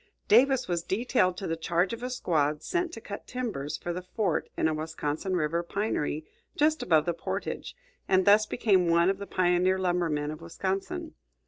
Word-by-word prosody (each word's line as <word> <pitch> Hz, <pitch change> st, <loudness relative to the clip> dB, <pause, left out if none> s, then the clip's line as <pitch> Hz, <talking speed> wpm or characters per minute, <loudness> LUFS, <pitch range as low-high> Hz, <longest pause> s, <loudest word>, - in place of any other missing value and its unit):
Davis 255 Hz, +3 st, +5 dB
was 175 Hz, -2 st, 0 dB
detailed 190 Hz, -2 st, +1 dB
to 195 Hz, -, -5 dB
the 165 Hz, -, -1 dB
charge 170 Hz, +4 st, 0 dB
of 230 Hz, -, -6 dB
a 250 Hz, -, -3 dB
squad 155 Hz, -, 0 dB
sent 360 Hz, -1 st, -1 dB
to 225 Hz, -, -7 dB
cut 200 Hz, -2 st, -8 dB
timbers 220 Hz, -, -3 dB
for 175 Hz, -, -4 dB
the 180 Hz, -, -4 dB
fort 185 Hz, -1 st, -1 dB
in -, -, +2 dB
a 160 Hz, -, +1 dB
Wisconsin 160 Hz, +3 st, -3 dB
River 165 Hz, 0 st, 0 dB
pinery 170 Hz, -5 st, -2 dB, 0.3 s
just 310 Hz, +1 st, +2 dB
above 160 Hz, -3 st, +3 dB
the 170 Hz, -, 0 dB
portage, -, -, -4 dB, 0.3 s
and 185 Hz, -1 st, +3 dB
thus 210 Hz, +1 st, +6 dB
became 190 Hz, -8 st, +2 dB
one 170 Hz, +2 st, +4 dB
of 195 Hz, -, -5 dB
the 200 Hz, -, -6 dB
pioneer 185 Hz, +1 st, +2 dB
lumbermen 170 Hz, -5 st, 0 dB
of 155 Hz, +1 st, -8 dB
Wisconsin. 195 Hz, -, -3 dB
185 Hz, 185 wpm, -28 LUFS, 165-215 Hz, 0.3 s, thus